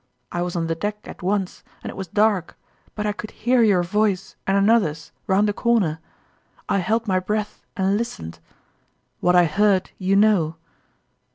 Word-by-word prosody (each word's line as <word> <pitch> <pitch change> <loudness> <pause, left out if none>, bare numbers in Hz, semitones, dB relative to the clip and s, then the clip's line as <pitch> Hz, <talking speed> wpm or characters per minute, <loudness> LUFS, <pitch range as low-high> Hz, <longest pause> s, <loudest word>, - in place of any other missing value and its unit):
I 175 - -2
was 175 0 -3
on 170 -1 0
the 165 - -1
deck 205 +5 -3
at - - -10
once, 190 0 -1 0.2
and - - -5
it - - -12
was 190 -1 -5
dark, 205 -1 +1 0.4
but 210 - -3
I 210 - +1
could 210 +1 -7
hear 245 +2 +1
your 200 -6 +4
voice 195 +1 0
and 195 +1 +3
another's 195 -8 +2 0.2
round 200 +2 +3
a 205 - 0
corner. 200 -10 +1 0.7
I 200 - +1
held 220 +5 0
my 185 -2 +2
breath 210 +2 -3 0.2
and 195 +1 +2
listened. 85 - -5 0.8
What 180 0 +3
I 175 -1 +6
heard, 195 +3 +2
you 190 +1 +1
know 195 -6 +3
195 Hz, 175 wpm, -22 LUFS, 180-210 Hz, 0.8 s, I